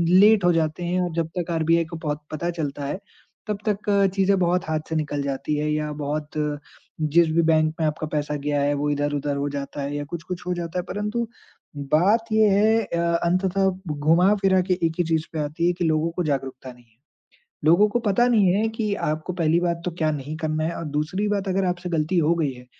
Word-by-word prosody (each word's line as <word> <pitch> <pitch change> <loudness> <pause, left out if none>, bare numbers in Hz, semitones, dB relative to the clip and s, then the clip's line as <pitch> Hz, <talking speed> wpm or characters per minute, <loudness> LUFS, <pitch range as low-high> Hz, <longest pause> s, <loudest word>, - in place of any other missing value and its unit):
Late 205 +1 +6
हो 175 - +5
जाते 160 +1 -1
हैं 180 +1 0
और 175 -1 -1
जब 165 -1 0
तक 175 -1 -2
आरबीआई 165 0 +2
को 165 +1 -8
पौ 150 -2 -1 0.2
पता 155 +3 -2
चलता 145 -2 -3
है, 145 +7 -3 0.5
तब 210 -1 -1
तक 210 0 -1 0.3
चीज़ें 195 0 +3
बहुत 180 0 +1
हाथ 155 -1 +1
से 160 - -2
निकल 145 -2 -1
जाती 140 +2 -2
हैं 150 +1 -1
या 150 0 -1
बहुत 150 +1 -3 0.8
जिस 170 +2 +5
भी 165 +1 +3
बैंक 155 -1 +3
में 160 - +1
आपका 155 +1 -3
पैसा 150 -1 -2
गया 145 0 -1
है, 145 +1 +2
वो 145 +1 -1
इधर-उधर 145 0 -1
हो 140 +1 -1
जाता 140 0 -5
है 140 +1 -3
या 145 - -2
कुछ-कुछ 175 +3 -6
हो 180 - +1
जाता 175 0 -3
है - - -3
परंतु 210 +3 -2 0.7
बात 205 +9 +4
ये 215 0 +5
है 215 +3 +4
अ, 170 -4 -3 0.3
अंततः 190 +2 +2 0.2
ब 150 -2 -4
घुमा-फिरा 190 +5 +4
के - - +5
एक 160 - -4
ही - - +4
चीज़ 160 -1 0
पे 160 - -3
आती 155 +4 -1
है 175 - +2
कि 180 - -1
लोगों 160 +1 +1
को 180 - 0
जागरूकता 135 -3 -3
नहीं 125 0 -21
है। 115 -1 -34 0.7
लोगों 175 +7 +5
को 240 - 0
पता 220 +5 +3
नहीं 205 -7 +4
है 220 +2 +1
कि 210 -3 0 0.2
आपको 155 +4 -3
पहली 170 -1 +2
बात 170 -1 -1
तो 180 - -1
क्या 155 -1 +2
नहीं 150 +1 -5
करना 155 -1 -1
है 170 +1 -2
और - - -5
दूसरी 185 +7 -1
बात 200 -1 -1
अगर 190 +1 +1
आपसे 180 0 -2
गलती 165 +2 0
हो 165 +1 +3
गई 155 -5 0
है, 125 0 -14
165 Hz, 225 wpm, -24 LUFS, 150-185 Hz, 0.8 s, Late